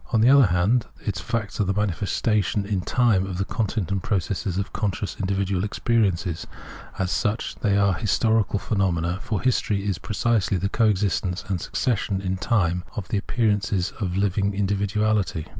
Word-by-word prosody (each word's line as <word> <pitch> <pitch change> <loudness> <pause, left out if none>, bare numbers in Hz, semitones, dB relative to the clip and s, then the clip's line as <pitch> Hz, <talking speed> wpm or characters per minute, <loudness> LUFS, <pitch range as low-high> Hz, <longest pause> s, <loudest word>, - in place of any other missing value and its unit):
On 115 - +3
the 115 +3 +5
other 140 -5 +7
hand, 95 +7 +2 0.2
its 100 -4 -2
facts 110 0 -2
are - - +4
the 95 0 -1
manifestations 105 +1 0
in 100 -3 0
time 110 -2 +2
of 95 -2 -4
the 95 - -1
content 105 -5 -2
and 100 -1 0
processes 95 -1 -1
of 100 +1 -3
conscious 105 -1 -2
individual 95 -1 0
experience: 105 -4 +1 0.7
as 95 -1 -1
such, 105 +4 -1
they 100 -1 +1
are 100 -1 +3
historical 110 +2 +1
phenomena, 95 -4 0
for 105 -3 -2
history 105 -5 +1
is 100 -4 -1
precisely 105 -2 0
the 100 +2 -1
co 115 +1 +2
existence 95 -2 0
and 90 -4 -1
succession 105 -5 -1
in 95 -1 -2
time 90 -5 +1
of 105 -6 -5
the 105 - 0
appearances 105 -4 0
of 90 -4 -2
a - - +2
living 100 0 +1
individuality. 100 -3 0
100 Hz, 170 wpm, -24 LUFS, 95-110 Hz, 0.7 s, other